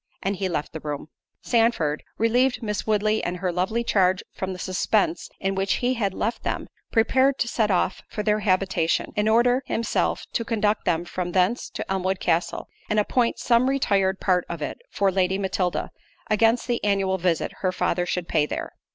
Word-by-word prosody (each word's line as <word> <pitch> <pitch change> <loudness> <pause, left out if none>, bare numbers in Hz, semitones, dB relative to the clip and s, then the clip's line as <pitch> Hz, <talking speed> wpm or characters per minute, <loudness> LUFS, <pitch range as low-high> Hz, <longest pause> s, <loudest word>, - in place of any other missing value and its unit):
And 195 0 -1
he 190 0 -1
left 150 -4 -3
the 160 - -5
room. 150 0 -5 0.3
Sandford, 225 -11 +2
to - - -24
relieve 245 +3 +2
Miss 210 -1 -3
Woodley 215 0 +1
and 180 +1 -2
her 180 0 -1
lovely 190 +7 0
charge 185 -4 +2
from 190 0 -4
the 185 - -5
suspence 185 0 0
in 195 0 -1
which 195 0 0
he 250 +1 +1
had 200 -6 -1
left 230 +3 -2
them, - - -2 0.3
prepared 260 +4 +3
to 235 - 0
set 220 -2 +1
off 185 -1 +1
for 210 - -4
their 210 0 +2
habitation, 185 -4 +1
in 210 0 +1
order 245 +3 +4
himself 230 - 0
to 230 - 0
conduct 215 -2 0
them 170 +1 +1
from 175 0 -4
thence 190 +6 +1
to - - -5
Elmwood 190 0 -1
Castle, 170 0 0 0.2
and 215 - +2
appoint 235 +3 +1
some 245 +2 +3
retired 195 -8 +1
part 180 -2 +2
of 170 - -4
it 150 - -4
for 200 -1 +1
Lady 190 0 +1
Matilda, 190 -2 -1 0.4
against 225 +3 +3
the 240 -2 -1
annual 195 -2 +1
visit 170 -2 0
her 185 - +1
father 175 -1 0
should 180 -1 -2
pay 150 -2 +2
there. - - -5
195 Hz, 190 wpm, -24 LUFS, 180-225 Hz, 0.4 s, order